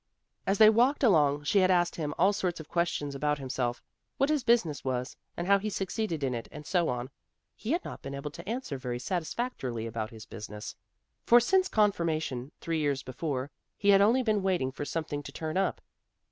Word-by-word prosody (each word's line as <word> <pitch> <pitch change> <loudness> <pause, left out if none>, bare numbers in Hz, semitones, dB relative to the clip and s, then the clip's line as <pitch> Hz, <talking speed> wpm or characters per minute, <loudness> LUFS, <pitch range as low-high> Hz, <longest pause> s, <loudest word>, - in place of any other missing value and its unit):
As 195 +1 +2
they 215 +1 +8
walked 250 +6 +3
along 150 - +4
she 200 +7 +3
had 185 -1 +4
asked 175 -1 +3
him 150 -2 -3
all 190 +4 +4
sorts 180 -3 -2
of 155 - -9
questions 170 -4 -1
about 150 +1 0
himself; 130 -3 -3 0.3
what 275 +3 +2
his 300 -4 +1
business 200 - +2
was, 125 -1 -2 0.2
and 175 - -2
how 200 +1 +5
he 215 +2 -3
succeeded 190 -4 -2
in 130 -2 0
it 115 -1 -4
and 150 0 -9
so 175 -1 +1
on. 125 +2 -3 0.4
He 235 - -2
had 350 - -1
not - - -7
been 140 0 -6
able 140 +1 -5
to 170 +6 -9
answer 230 - -3
very 125 -1 -3
satisfactorily 155 - -3
about 110 -1 -3
his 110 -2 -11
business, 105 -1 -8 0.5
for 240 - +7
since 375 +10 +3
Confirmation, 160 - 0
three 165 -1 -1
years 140 -3 0
before, 130 +1 -3 0.3
he 205 - +1
had 195 -1 +7
only 235 +6 +4
been 215 -3 +1
waiting 180 -9 0
for 145 - -5
something 155 -2 -3
to - - -9
turn 160 0 -4
up. 195 +1 0
160 Hz, 200 wpm, -29 LUFS, 135-200 Hz, 0.5 s, they